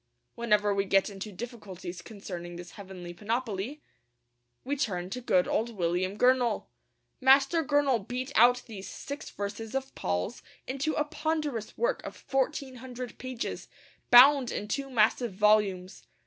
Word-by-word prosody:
Whenever 210 -3 +2
we 200 0 +1
get 195 +1 +2
into 200 +2 -7
difficulties 190 -5 -7
concerning 175 -3 -8
this 175 0 -9
heavenly 185 -3 -9
panoply, 225 - -3 0.8
we 280 +2 -1
turn 185 -9 -2
to 250 - -4
good 185 -7 +2
old 230 +1 -1
William 180 +3 0
Gurnall. 250 -3 +3 0.5
Master 275 +5 +5
Gurnall 275 -7 +2
beat 255 +2 -3
out 245 +2 +5
these 195 -5 -8
six 280 +9 -7
verses 215 +4 -5
of 270 0 -3
Paul's 90 - -2 0.2
into 275 +4 -1
a 300 - +2
ponderous 300 -6 -3
work - - 0
of - - -8
fourteen 270 -1 -2
hundred 250 0 -8
pages, 255 -2 -5 0.4
bound 260 +1 +8
in 210 - -4
two 275 +5 -2
massive 230 -1 +2
volumes. 200 -2 +2
230 Hz, 140 wpm, -29 LUFS, 195-265 Hz, 0.8 s, bound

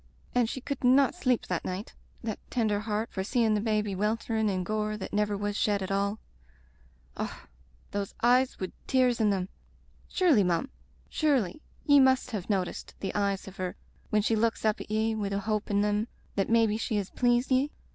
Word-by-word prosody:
And 245 -2 +2
she 260 - -5
could 280 0 -4
not 260 +2 +5
sleep 255 -9 0
the 180 -2 -2
night, 185 +4 -5 0.3
that 220 -3 -3
tender 215 -4 +1
heart, 215 +1 -2
for 190 - -3
seein' 225 +1 +2
the 210 - +1
baby 210 -2 0
wel 210 +4 +1
terin' 220 -2 -1
in 185 -2 -1
gore 215 +2 -1
that 190 - -7
never 210 0 +1
was 205 0 -2
shed 205 -2 +1
at 190 - -4
all. 200 +2 0 1.0
Och - - -5 0.2
— - - -32
those 200 -1 -3
eyes 250 +2 +3
wid 185 - -4
tears 250 -3 +3
in 215 - +4
them! 190 -2 0 0.6
Surely, 325 - +4
mum 180 +10 0 0.2
— - - -33
^surely, 270 - +1 0.3
ye 285 -1 +7
must 260 -1 +4
have 205 -4 -4
noticed 190 -3 -2
the 195 - -3
eyes 200 -2 -1
of 195 - -10
her 185 -1 -3 0.3
when 210 -1 +2
she 225 - +2
looks 225 +1 0
up 215 +1 +1
at - - -9
ye 220 +1 +1
wid 205 -2 -2
the 200 - 0
hope 215 0 -2
in 200 -1 +2
them 210 +2 +1 0.3
that 195 - 0
maybe 225 -2 +3
she 225 0 -2
has 200 -2 -2
pleased 245 +1 +2
ye? 260 +3 +3
215 Hz, 205 wpm, -29 LUFS, 200-240 Hz, 1.0 s, ye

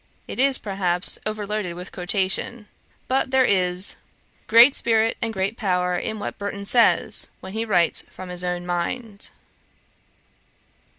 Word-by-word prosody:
It - - -7
is, 270 0 +5
perhaps, 190 -3 +1
overloaded 210 -4 -4
with 180 +1 -9
quotation. 195 +4 -2 0.4
But 260 0 0
there 260 -1 +3
is 180 -2 0 0.5
great 235 +5 +7
spirit 225 -2 +1
and 230 - -2
great 200 +2 -3
power 180 -3 0
in 220 +5 -4
what 205 - -6
Burton 200 0 -5
says, 235 +3 +4
when 190 - -10
he 225 +1 -3
writes 175 -6 +2
from 185 -1 -10
his 180 0 -3
own 180 0 -3
mind.' 200 +5 -4
200 Hz, 135 wpm, -22 LUFS, 180-225 Hz, 0.5 s, great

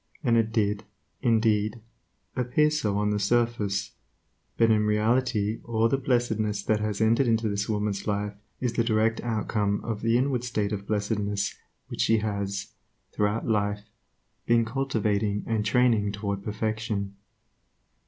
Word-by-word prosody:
And 120 -4 +3
it 115 -1 +2
did, 105 -2 0 0.4
indeed, 110 -1 +2 0.6
appear 130 +5 +2
so 105 -10 0
on 105 0 +1
the 105 - 0
surface; 105 -2 0 0.7
but 115 -1 +4
in 105 -1 +3
reality 110 0 +1
all 115 -1 +1
the 135 - +1
blessedness 110 -5 0
that 110 -1 +1
has 105 -1 -2
entered 115 +4 +3
into 115 -1 +2
this 100 0 -2
woman's 105 -1 -1
life 105 0 -1 0.3
is 125 -2 -1
the 115 - +2
direct 110 0 +1
outcome 105 -3 0
of 110 -2 -3
the 115 +1 +3
inward 130 -1 0
state 110 -4 -1
of 100 -1 -4
blessedness 105 -1 -1 0.3
which - - -4
she 115 - +4
has, 100 -1 -3 0.4
throughout 105 +2 0
life, 105 -2 0 0.6
been 115 -1 +4
cultivating 110 -5 0
and 110 -2 -1
training 115 -5 +3
toward 100 -1 -3
perfection. 110 -2 -2
110 Hz, 145 wpm, -27 LUFS, 105-115 Hz, 0.7 s, but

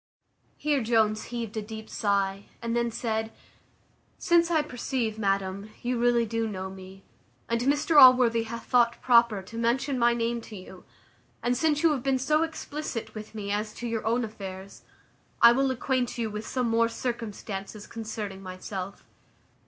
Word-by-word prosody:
Here 290 -2 +1
Jones 220 -2 +2
heaved 230 -3 -5
a - - 0
deep 220 +1 -8
sigh, 200 -1 0
and 230 0 -2
then 235 0 +1
said, 220 -1 -2 0.9
"Since 340 0 +3
I 315 -3 +2
perceive, 245 -5 -3
madam, 195 0 -1
you 245 0 -1
really 240 -1 +3
do 230 0 -1
know 190 -2 -5
me, 190 0 -12 0.4
and 235 0 0
Mr 290 +3 +4
Allworthy 250 -3 +7
hath 230 +1 -7
thought 235 -1 +3
proper 235 -5 +4
to 230 +4 -10
mention 250 +3 0
my 235 0 +4
name 235 0 -1
to 225 - -11
you; 185 -1 -11 0.6
and 245 +1 +1
since 310 +1 +1
you 330 - +5
have 280 -4 -1
been 270 0 +1
so 300 +4 +2
explicit 305 -6 -4
with 215 0 -9
me 200 -2 -4
as 210 +1 -2
to 240 - -6
your 225 -1 -2
own 235 +2 +1
affairs, 195 -3 -9 0.6
I 235 - +9
will 270 +2 +2
acquaint 255 -1 -1
you 225 -2 -2
with 210 +1 -6
some 255 -2 -1
more 230 0 +3
circumstances 215 -4 -5
concerning 215 -3 -6
myself." 185 +1 -7
230 Hz, 165 wpm, -27 LUFS, 210-250 Hz, 0.9 s, I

